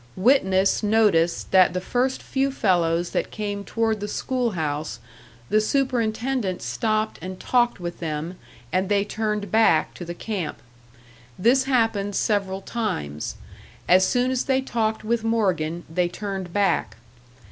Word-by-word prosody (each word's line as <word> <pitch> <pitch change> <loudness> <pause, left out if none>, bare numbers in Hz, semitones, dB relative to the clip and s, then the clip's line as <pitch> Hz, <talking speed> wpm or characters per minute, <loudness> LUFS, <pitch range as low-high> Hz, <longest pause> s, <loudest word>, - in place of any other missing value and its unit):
Witness 190 -4 +3
noticed 205 -6 +2
that 185 -1 +5
the - - +1
first 250 +7 -1
few 270 0 0
fellows 175 -8 +1
that - - -1
came 205 -1 -4
toward 225 0 0
the 205 - -4
school 250 0 -1
house, 150 -6 -2 0.5
the 215 - +3
superintendent 240 -4 0
stopped 215 - -1
and 185 +2 -7
talked 240 -4 +1
with 175 -1 -6
them 160 +2 -4 0.4
and 185 +1 +1
they 200 -1 +2
turned 210 -2 -2
back 220 -8 +3
to - - -8
the 175 0 -6
camp. 195 -4 -4 0.8
This 255 +7 +3
happened 225 -6 +1
several 195 -2 0
times: 185 - -3 0.5
as 185 +1 +6
soon 250 +5 +2
as 255 -1 -1
they 265 -1 +2
talked 220 -4 -1
with 225 +1 0
Morgan 180 -8 0
they 175 +2 0
turned 190 -1 -5
back. 200 +1 +1
205 Hz, 140 wpm, -24 LUFS, 180-230 Hz, 0.8 s, as